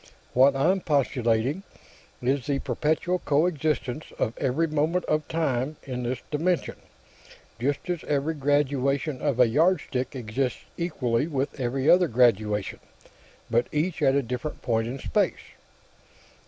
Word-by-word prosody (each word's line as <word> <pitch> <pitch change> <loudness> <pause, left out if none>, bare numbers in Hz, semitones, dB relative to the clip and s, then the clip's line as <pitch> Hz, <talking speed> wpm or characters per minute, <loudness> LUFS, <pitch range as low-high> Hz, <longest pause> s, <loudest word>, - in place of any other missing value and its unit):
What 135 +2 +5
I'm 180 +8 +2
postulating 130 -1 +1 0.6
is 130 0 0
the 140 -1 +1
perpetual 155 +7 0
coexistence 155 -3 0
of 110 - -1
every 135 +5 +1
moment 155 +3 0
of 155 -1 0
time 150 -3 -1
in 125 -2 -4
this 125 +1 -2
dimension, 170 +4 0 0.8
just 140 +7 -1
as 175 -2 -2
every 145 +2 0
graduation 140 -1 0
on 140 -4 0
a 125 - +8
yardstick 145 -1 +1
exists 125 +2 -2
equally 140 -6 -1
with 140 -2 -3
every 130 +2 -1
other 180 0 +6
graduation, 110 -5 +2 0.7
but 120 +1 +2
each 160 +3 -1
at 135 -2 +4
a 140 - +2
different 125 +6 -5
point 115 -1 0
in 125 +3 -4
space." - - 0
140 Hz, 130 wpm, -26 LUFS, 125-155 Hz, 0.8 s, a